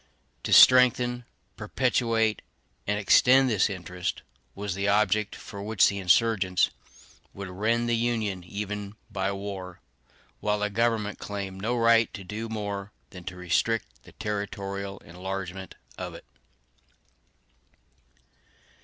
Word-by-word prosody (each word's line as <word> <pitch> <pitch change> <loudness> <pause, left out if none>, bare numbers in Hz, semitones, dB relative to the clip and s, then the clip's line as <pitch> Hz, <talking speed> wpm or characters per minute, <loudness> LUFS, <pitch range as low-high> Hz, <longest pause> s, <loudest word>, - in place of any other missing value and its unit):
To - - -3
strengthen, 125 -1 +6 0.3
perpetuate, 115 -2 +1 0.5
and 105 +1 +1
extend 130 +5 +5
this 105 -1 +3
interest 90 -2 -4 0.3
was 100 -1 -3
the 100 +2 -2
object 105 0 +2
for 100 -2 -9
which 105 0 +3
the 100 - -4
insurgents 95 0 +3 0.6
would 100 -1 -6
rend 115 +6 0
the 120 - +2
Union, 110 -5 -1
even 105 +2 -5 0.2
by 95 -1 -1
war; 95 -2 -6 0.6
while 105 0 0
the 105 0 -1
government 110 -1 0
claimed 100 -2 -5
no 120 +4 0
right 115 -1 +4
to 100 - -8
do 110 +5 -5
more 100 -2 -4 0.2
than 90 -2 -10
to 90 - -6
restrict 90 +6 0 0.2
the - - -17
territorial 100 -2 -4
enlargement 95 +1 -6 0.2
of - - -5
it. - - -12
105 Hz, 120 wpm, -27 LUFS, 95-110 Hz, 0.6 s, strengthen